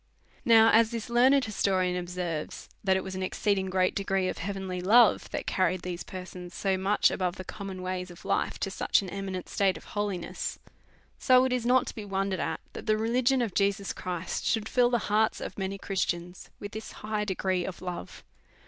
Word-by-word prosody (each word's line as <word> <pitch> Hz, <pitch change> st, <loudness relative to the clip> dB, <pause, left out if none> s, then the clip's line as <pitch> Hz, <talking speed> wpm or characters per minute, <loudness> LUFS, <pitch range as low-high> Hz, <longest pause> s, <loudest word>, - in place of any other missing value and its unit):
Now, 225 Hz, -1 st, +7 dB
as 225 Hz, 0 st, +5 dB
this 230 Hz, 0 st, -5 dB
learned 260 Hz, +3 st, +5 dB
historian 190 Hz, -4 st, +1 dB
observes, 175 Hz, -3 st, -4 dB, 0.2 s
that 190 Hz, -1 st, +3 dB
it 190 Hz, -, -3 dB
was 190 Hz, -, -6 dB
an 185 Hz, -, -4 dB
exceeding 190 Hz, 0 st, 0 dB
great 185 Hz, 0 st, +2 dB
degree 195 Hz, -1 st, 0 dB
ot -, -, -3 dB
heavenly 190 Hz, -1 st, -4 dB
love 220 Hz, +4 st, +5 dB
tliat -, -, -4 dB
car 185 Hz, -, +2 dB
ried 185 Hz, -1 st, -3 dB
these 180 Hz, -1 st, -4 dB
persons 180 Hz, -1 st, -8 dB
so 195 Hz, -1 st, +1 dB
much 195 Hz, +2 st, +3 dB
above 180 Hz, -1 st, -1 dB
the 185 Hz, -, -7 dB
common 195 Hz, -1 st, -7 dB
ways 185 Hz, 0 st, -3 dB
of 175 Hz, -, -13 dB
life -, -, 0 dB
to 195 Hz, -, -1 dB
such 195 Hz, -, +2 dB
an 185 Hz, -, -7 dB
eminent 195 Hz, -2 st, -4 dB
state 195 Hz, -2 st, +1 dB
of -, -, -13 dB
holiness, 205 Hz, -4 st, -3 dB, 0.6 s
so 255 Hz, -1 st, +5 dB
it 260 Hz, -, 0 dB
is 240 Hz, -2 st, -1 dB
not 255 Hz, +1 st, +4 dB
to -, -, -6 dB
be 215 Hz, -, -7 dB
wondered 195 Hz, -1 st, -1 dB
at -, -, -2 dB
that -, -, -8 dB
the 215 Hz, 0 st, +3 dB
religion 245 Hz, +3 st, +2 dB
of 215 Hz, -6 st, -3 dB
Jesus 200 Hz, 0 st, +1 dB
Christ 180 Hz, -2 st, -4 dB
should 220 Hz, -2 st, 0 dB
fill 245 Hz, 0 st, +3 dB
the 240 Hz, -, +2 dB
hearts 215 Hz, +1 st, +2 dB
of -, -, -6 dB
many 195 Hz, +1 st, -2 dB
Christians 180 Hz, -2 st, -3 dB
with 205 Hz, -, -7 dB
this 220 Hz, +1 st, -7 dB
high 215 Hz, -1 st, -1 dB
de 195 Hz, -3 st, -2 dB
gree 185 Hz, -1 st, 0 dB
of 185 Hz, 0 st, -6 dB
love. 175 Hz, -, -7 dB
195 Hz, 205 wpm, -28 LUFS, 185-220 Hz, 0.6 s, Now